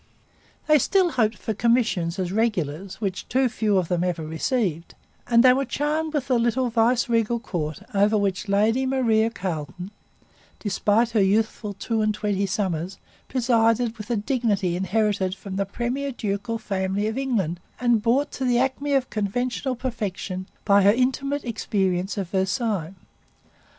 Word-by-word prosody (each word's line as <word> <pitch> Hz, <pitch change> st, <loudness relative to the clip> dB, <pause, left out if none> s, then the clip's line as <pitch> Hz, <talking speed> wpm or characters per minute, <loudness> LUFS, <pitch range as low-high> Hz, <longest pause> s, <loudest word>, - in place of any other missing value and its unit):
They 305 Hz, -1 st, +5 dB
still 370 Hz, +5 st, +2 dB
hoped 220 Hz, -5 st, +1 dB
for 220 Hz, -, -3 dB
commissions 215 Hz, -7 st, +1 dB
as 185 Hz, -2 st, -2 dB
regulars, 190 Hz, -4 st, -1 dB
which 195 Hz, -4 st, -4 dB
too 260 Hz, 0 st, +3 dB
few 215 Hz, -4 st, 0 dB
of 180 Hz, -3 st, +1 dB
them 175 Hz, 0 st, 0 dB
ever 175 Hz, -3 st, -2 dB
received; 170 Hz, -, -2 dB, 0.3 s
and 235 Hz, 0 st, +5 dB
they 255 Hz, -1 st, +7 dB
were 270 Hz, +2 st, +1 dB
charmed 300 Hz, +4 st, -1 dB
with 280 Hz, -3 st, -1 dB
the 250 Hz, -3 st, +2 dB
little 240 Hz, +1 st, +1 dB
viceregal 230 Hz, 0 st, +2 dB
court 155 Hz, -8 st, -4 dB
over 205 Hz, +2 st, +3 dB
which 200 Hz, 0 st, -1 dB
Lady 225 Hz, +6 st, +2 dB
Maria 230 Hz, -4 st, +2 dB
Carleton, 180 Hz, -2 st, -5 dB, 0.7 s
despite 210 Hz, +3 st, +1 dB
her 220 Hz, -3 st, +3 dB
youthful 210 Hz, +1 st, 0 dB
two 220 Hz, +3 st, -1 dB
and 215 Hz, -1 st, +1 dB
twenty 200 Hz, -2 st, -1 dB
summers, 185 Hz, -2 st, -2 dB, 0.3 s
presided 235 Hz, -2 st, +2 dB
with 210 Hz, -, -8 dB
a 235 Hz, -, +1 dB
dignity 205 Hz, -6 st, 0 dB
inherited 190 Hz, 0 st, 0 dB
from 195 Hz, -1 st, -8 dB
the 200 Hz, -1 st, -1 dB
premier 250 Hz, +7 st, -2 dB
ducal 225 Hz, 0 st, -3 dB
family 195 Hz, -1 st, -2 dB
of 220 Hz, +1 st, -2 dB
England 220 Hz, -11 st, -1 dB, 0.2 s
and 240 Hz, -3 st, +2 dB
brought 245 Hz, +6 st, +1 dB
to 265 Hz, -, -5 dB
the 245 Hz, -2 st, +2 dB
acme 270 Hz, +3 st, 0 dB
of 265 Hz, -2 st, +1 dB
conventional 245 Hz, +5 st, -1 dB
perfection 205 Hz, -6 st, -4 dB, 0.2 s
by 200 Hz, -1 st, +5 dB
her 200 Hz, +1 st, +6 dB
intimate 270 Hz, +4 st, 0 dB
experience 195 Hz, -4 st, -1 dB
of 195 Hz, -3 st, -2 dB
Versailles. 195 Hz, -2 st, -1 dB
220 Hz, 155 wpm, -24 LUFS, 190-245 Hz, 0.7 s, they